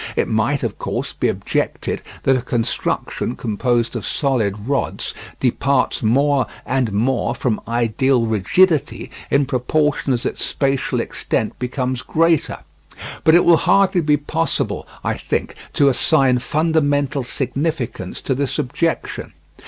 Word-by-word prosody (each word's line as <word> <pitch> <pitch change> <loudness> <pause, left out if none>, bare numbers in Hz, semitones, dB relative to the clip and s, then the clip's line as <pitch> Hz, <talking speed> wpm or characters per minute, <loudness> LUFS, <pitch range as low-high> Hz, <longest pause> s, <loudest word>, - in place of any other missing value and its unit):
It - - +1
might, 115 +6 0
of 115 -4 -3
course, - - -3
be - - 0
objected - - -2 0.2
that 135 - +4
a 130 - 0
construction 120 0 -2
composed 120 +1 -1
of 115 - -3
solid 110 -7 -1
rods 140 0 -1 0.3
departs 130 +1 +1
more 135 +4 +2 0.2
and 130 -4 0
more 120 +5 0
from 115 -5 -1
ideal 120 +2 +1
rigidity 140 - +2 0.2
in 140 0 +3
proportion 140 +3 0
as 120 -1 -1
its - - -2
spatial 135 -1 0
extent - - -2
becomes 125 0 -2
greater. 165 -1 +1 0.6
But 160 - +6
it 175 - +5
will 170 -1 +7
hardly 195 -1 +3
be 150 -1 +3
possible, 160 +3 -2 0.2
I - - 0
think, - - -2 0.2
to 140 - +4
assign 135 -1 +3
fundamental 145 -2 +1
significance 130 - -3
to 135 - -1
this 135 +1 -1
objection. 165 +6 -2
135 Hz, 130 wpm, -20 LUFS, 120-145 Hz, 0.6 s, will